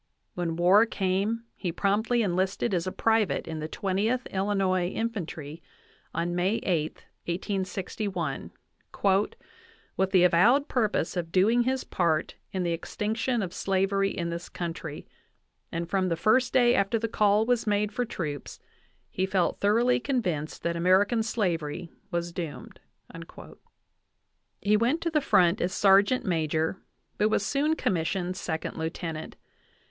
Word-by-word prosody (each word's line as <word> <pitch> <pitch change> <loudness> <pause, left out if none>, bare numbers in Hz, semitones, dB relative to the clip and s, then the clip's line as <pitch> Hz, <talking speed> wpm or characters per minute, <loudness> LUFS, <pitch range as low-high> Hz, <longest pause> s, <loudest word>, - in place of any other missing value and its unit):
When 170 -2 -2
war 190 +6 +5
came 200 +3 -1
he 180 - -3
promptly 215 +6 +1
enlisted 190 +4 0
as 175 0 0
a - - -1
private 225 -1 +1
in 160 -1 -4
the 155 - -4
Twentieth 205 +8 -1
Illinois 190 -2 +1
Infan 225 -7 -2
try 155 +1 -8 0.5
on 170 +1 -2
May 180 +4 +1
8, 160 -4 -1 0.2
1861, 185 -2 -3 1.5
"with 190 0 +2
the 185 -2 +4
avowed 210 - +5
purpose 215 -9 0
of 170 -2 -3
doing 225 +7 +3
his 260 0 0
part 165 -3 0 0.2
in 185 -1 -2
the 170 - 0
extinction 220 +7 -1
of 180 - -5
slavery 195 +1 +1
in 170 -3 -3
this 170 +1 -6
country; 165 -3 -6 0.6
and 170 0 -3
from 185 0 0
the 165 - +1
first 245 +7 +3
day 245 -2 +5
after 200 +2 +2
the 230 +1 -1
call 210 -1 +3
was 245 -1 +1
made 210 0 +1
for 245 +4 -1
troops 150 - -5 0.5
he 190 +1 -2
felt 190 -2 0
thoroughly 230 +5 +3
convinced 185 - -2
that 170 0 -1
American 190 +6 +3
slavery 175 -7 -2 0.2
was 170 -2 -2
doomed." 165 -4 -6 1.8
He 210 +1 +3
went 245 +10 +1
to 335 - -1
the 305 -1 +2
front 180 -7 +3
as 180 - 0
sergeant 200 +6 +4
major, 160 0 0 0.4
but 210 +1 +3
was 205 -1 +1
soon 295 +3 +1
commissioned 180 - -1
sec 160 -3 -4
ond - - -5
lieutenant. 160 0 -4
190 Hz, 140 wpm, -27 LUFS, 170-220 Hz, 1.8 s, war